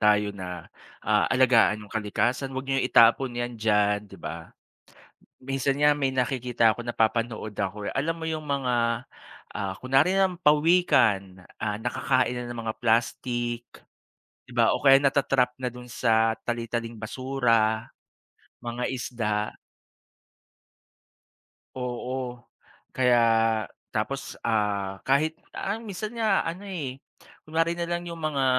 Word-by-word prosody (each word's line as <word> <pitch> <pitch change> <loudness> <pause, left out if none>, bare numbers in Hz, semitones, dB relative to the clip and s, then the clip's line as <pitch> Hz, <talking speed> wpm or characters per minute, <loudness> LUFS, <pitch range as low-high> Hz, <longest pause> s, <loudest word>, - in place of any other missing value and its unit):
Tayo 105 -1 +3
na, 90 -3 -8 0.3
ah, 105 0 +3
alagaan 115 -5 +4
yung - - -15
kalikasan. 120 +5 -1
'Wag 130 0 -4
niyong 135 -1 0
itapon 120 +2 +5
'yan 120 -2 -4
diyan, 105 -1 +2
di 95 - -12
ba? 80 0 -7 0.9
Minsan 135 +1 -1
nga, 150 0 +5
may 140 -2 0
nakikita 125 -3 +1
ako, - - -8
napapanood 115 -2 -1
ako, 100 +1 -3
eh. - - -10
Alam 155 +5 0
mo 160 - -5
yung 155 -1 -2
mga, 125 -4 0 0.5
ah, 95 -1 -3
kunwari 140 +9 +3
na 195 - +5
lang 180 - -6
pawikan. 120 - +3 0.2
Ah, 105 -1 -1
nakakain 130 +2 0
na 125 - -4
ng 120 - -6
mga 110 - -1
plastik, 120 +1 0 0.8
di 125 - -15
ba? 115 -2 +3
O - - -8
kaya 135 0 +8
nata-trap 135 -3 +2
na 125 -2 -4
dun 125 0 -11
sa 110 -1 +2
tali-taling 115 -1 -3
basura, 115 -2 0 0.8
mga 120 +1 -3
isda. 115 -5 -2 2.2
Oo. 125 0 -4 0.6
Kaya 125 -2 +4 0.7
tapos, - - -3
ah, 100 -3 -1
kahit 155 +4 +2 0.2
ah, 205 +3 -2
minsan 215 0 -6
nga 220 -4 +2
ano, 170 +4 -4
eh, 135 -8 -5 0.4
kunwari 165 +2 0
na 170 0 -3
lang 175 0 -2
yung 170 -1 -7
mga 145 -3 0
125 Hz, 130 wpm, -26 LUFS, 110-135 Hz, 2.2 s, kaya